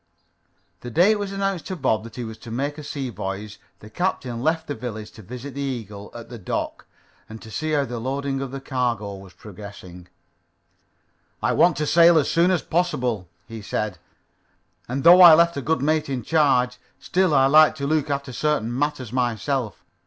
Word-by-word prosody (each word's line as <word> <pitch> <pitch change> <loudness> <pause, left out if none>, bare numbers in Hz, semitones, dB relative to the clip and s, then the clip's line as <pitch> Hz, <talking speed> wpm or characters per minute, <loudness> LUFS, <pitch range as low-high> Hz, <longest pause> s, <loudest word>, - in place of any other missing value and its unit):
The 120 - -8
day 175 - +4
it 215 - +1
was 200 -1 -4
announced 195 -3 -2
to 190 - -4
Bob 120 -9 0
that 115 - -11
he 125 - -5
was 110 -1 -8
to 120 - -11
make 140 +6 -3
a - - -8
sea 140 -3 -5
voyage, 100 +1 -6 0.2
the 105 - -12
captain 130 - -2
left 160 +3 0
the 145 - -4
village 110 -5 -7
to - - -13
visit 125 +7 -8
the 140 - -5
Eagle 110 -7 -5
at 115 -1 -9
the 120 -2 -9
dock 90 - -4 0.4
and 110 +1 -9
see 155 +8 -3
how 145 -2 +2
the 120 -1 -5
loading 135 +2 -2
of 135 - -4
the 135 +2 -6
cargo 120 -6 -2
was 95 -2 -13
progressing. 95 -3 -11 1.3
"I - - 0
want 175 -4 +4
to 150 - -1
sail 170 +2 +6
as 150 - +2
soon 170 +2 +3
as 180 -3 +1
possible," 125 - -1 0.2
he 115 -1 -8
said, 105 -3 -3 0.9
"and 130 +3 -3
though 175 +2 +8
I 170 -3 +11
left 170 +1 +3
a 140 - -3
good 160 0 0
mate 155 0 +1
in 130 -3 -3
charge, 125 -4 +2 0.2
still 180 -3 +1
I 135 -1 +5
like 155 +3 +6
to 140 -2 -4
look 155 0 0
after 140 -2 -3
certain 120 -5 -1
matters 130 -4 -2
myself. 125 0 -2
135 Hz, 195 wpm, -23 LUFS, 115-155 Hz, 1.3 s, I